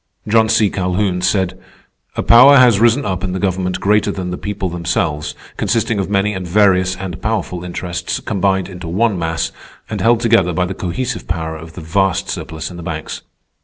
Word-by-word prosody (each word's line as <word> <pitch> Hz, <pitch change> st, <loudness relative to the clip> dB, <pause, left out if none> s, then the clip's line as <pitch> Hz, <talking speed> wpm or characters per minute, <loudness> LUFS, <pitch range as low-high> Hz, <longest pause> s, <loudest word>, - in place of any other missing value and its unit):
John 110 Hz, +1 st, +3 dB
C. 110 Hz, -2 st, +3 dB
Calhoun 90 Hz, 0 st, -1 dB
said: 95 Hz, 0 st, 0 dB, 0.6 s
"_A -, -, -1 dB
power 130 Hz, +4 st, +8 dB
has 125 Hz, -6 st, +6 dB
risen 120 Hz, +5 st, +3 dB
up 95 Hz, 0 st, -2 dB
in 95 Hz, -2 st, -2 dB
the 95 Hz, -, -2 dB
government 90 Hz, -1 st, -1 dB
greater 105 Hz, +1 st, +2 dB
than 90 Hz, -2 st, -4 dB
the -, -, -2 dB
people 105 Hz, -1 st, -3 dB
themselves, 85 Hz, -3 st, -2 dB, 0.2 s
consisting 115 Hz, -2 st, 0 dB
of 95 Hz, -, -2 dB
many 105 Hz, +1 st, +1 dB
and 95 Hz, -2 st, -5 dB
various 95 Hz, -1 st, +3 dB
and 95 Hz, -3 st, -7 dB
powerful 105 Hz, -5 st, -2 dB
interests, 90 Hz, 0 st, -4 dB
combined 95 Hz, -1 st, 0 dB
into 90 Hz, -2 st, -8 dB
one 100 Hz, +3 st, +1 dB
mass, 80 Hz, 0 st, -2 dB, 0.4 s
and -, -, -3 dB
held 115 Hz, 0 st, +4 dB
together 115 Hz, -7 st, +3 dB
by 90 Hz, +3 st, +1 dB
the 95 Hz, -, -4 dB
cohesive 115 Hz, +7 st, -4 dB
power 80 Hz, -2 st, -3 dB
of 80 Hz, +1 st, -10 dB
the 90 Hz, -, -8 dB
vast 95 Hz, +3 st, 0 dB
surplus 80 Hz, 0 st, -5 dB
in 85 Hz, -, -9 dB
the 85 Hz, -, -8 dB
banks_." 80 Hz, -1 st, -5 dB
95 Hz, 190 wpm, -17 LUFS, 90-105 Hz, 0.6 s, power